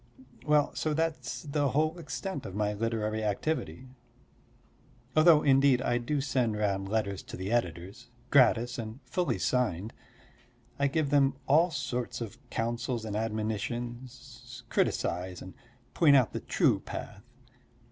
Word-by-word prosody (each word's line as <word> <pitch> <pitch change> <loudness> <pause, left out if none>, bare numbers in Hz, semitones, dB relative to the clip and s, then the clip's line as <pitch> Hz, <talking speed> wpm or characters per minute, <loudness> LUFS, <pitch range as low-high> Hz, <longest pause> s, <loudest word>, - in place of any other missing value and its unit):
Well, 150 -1 +3
so 155 -1 -1
that's 150 -6 -2
the 145 -1 0
whole 155 +5 0
extent 145 +2 -5
of 95 - -8
my 105 0 0
literary 110 0 -2
activity. 130 +5 -2 1.3
Though 155 0 +6
indeed 135 -2 +5
I 120 -2 0
do 140 +4 -1
send 125 -5 0
round 100 -2 -1
letters 105 -3 -1
to - - -9
the 95 +3 -4
editors 95 +2 -2 0.2
gratis 120 -3 +4
and 110 +2 -6
fully 175 +8 -1
signed. 110 -5 0 0.9
I 140 - +3
give 145 0 0
them 140 -2 +4
all 160 +6 +5
sorts 125 -5 -3
of 115 0 -7
counsels 120 0 -2
and 105 -2 -4
admonitions, 120 +3 -5
criticise 90 +1 -1
and 95 - -10 0.4
point 150 -4 +5
out 130 -4 +3
the - - -2
true - - +2
path. - - -8
120 Hz, 135 wpm, -29 LUFS, 110-140 Hz, 1.3 s, Though